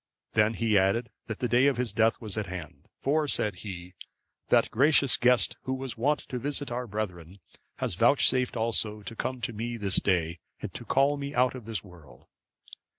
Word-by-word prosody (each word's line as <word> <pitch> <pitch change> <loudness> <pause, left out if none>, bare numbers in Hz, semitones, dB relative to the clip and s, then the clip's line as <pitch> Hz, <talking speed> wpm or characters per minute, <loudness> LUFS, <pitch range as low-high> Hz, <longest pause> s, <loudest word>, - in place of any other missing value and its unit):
Then 110 +1 +3
he 110 -3 +3
added 105 +5 +1 0.2
that 110 - -4
the 125 - -1
day 125 +3 +4
of 140 -3 +2
his 120 -4 -1
death 110 +1 +2
was 110 -5 -6
at 105 -2 -3
hand; 85 -4 -8
for, 150 +2 +1
said 105 -8 +1
he, 90 -2 -8 0.6
"that - - +4
gracious 140 +1 +4
guest, 125 0 +3
who 130 - -1
was 130 -2 -5
wont 145 +6 +1
to 125 - -3
visit 145 0 -2
our 125 +1 -3
brethren, 95 -4 -5 0.4
has - - -2
vouchsafed 125 +4 +3
also 110 -2 -1
to 115 - -7
come 130 +2 -3
to 120 0 -1
me 115 +2 -4
this 100 -3 +1
day, 85 -3 +1 0.2
and - - -6
to - - -8
call 140 +2 +2
me 140 +1 -5
out 125 0 +3
of 125 -4 -9
this 115 -2 -3
world. 90 -6 -16
115 Hz, 195 wpm, -28 LUFS, 100-130 Hz, 0.6 s, day